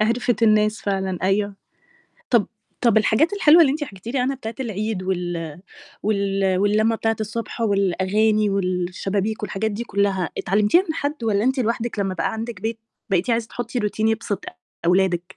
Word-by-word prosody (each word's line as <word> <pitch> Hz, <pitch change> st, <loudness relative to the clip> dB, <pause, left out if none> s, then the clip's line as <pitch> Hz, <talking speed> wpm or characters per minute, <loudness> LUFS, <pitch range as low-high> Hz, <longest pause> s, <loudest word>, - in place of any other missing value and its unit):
عرفت 235 Hz, +2 st, +1 dB
الناس 215 Hz, 0 st, +3 dB
فعلًا 190 Hz, -2 st, -1 dB
أيوه. 200 Hz, +2 st, +1 dB, 0.8 s
طب 235 Hz, -5 st, +4 dB, 0.3 s
طب 235 Hz, -3 st, +3 dB
الحاجات 225 Hz, -, +2 dB
الحلوة 340 Hz, -4 st, +6 dB
اللي 295 Hz, -, +6 dB
أنتِ 295 Hz, +1 st, -2 dB
حكيتِ 195 Hz, -6 st, -14 dB
لي -, -, +2 dB
عنها 255 Hz, +2 st, +1 dB
بتاعة 225 Hz, -3 st, -6 dB
العيد 215 Hz, -4 st, -2 dB
وال 175 Hz, -3 st, -3 dB, 0.4 s
وال 195 Hz, -2 st, +1 dB
واللمة 215 Hz, +3 st, +2 dB
بتاعة 225 Hz, 0 st, 0 dB
الصبح 220 Hz, +2 st, -4 dB
والأغاني 205 Hz, +1 st, +2 dB
والشبابيك 195 Hz, +3 st, -1 dB
والحاجات 210 Hz, +1 st, -2 dB
دي 215 Hz, +3 st, -4 dB
كلها، 200 Hz, -5 st, 0 dB
اتعلمتيها 210 Hz, -, +3 dB
من 315 Hz, -, -1 dB
حد؟ 285 Hz, -5 st, -3 dB
والَّا 210 Hz, -1 st, +1 dB
أنتِ 265 Hz, +1 st, +1 dB
لوحدِك 230 Hz, -1 st, -1 dB
لما 195 Hz, -2 st, -1 dB
بقى 165 Hz, -, -1 dB
عندِك 225 Hz, -3 st, -5 dB
بيت، 225 Hz, +1 st, -3 dB, 0.3 s
بقيتِ 190 Hz, +4 st, +1 dB
عايزة 230 Hz, -1 st, 0 dB
تحطي 245 Hz, +1 st, -4 dB
routine 210 Hz, 0 st, -3 dB
يبسط 220 Hz, -2 st, -2 dB, 0.4 s
أولادِك؟ 180 Hz, -1 st, +3 dB
210 Hz, 160 wpm, -22 LUFS, 195-230 Hz, 0.8 s, الحلوة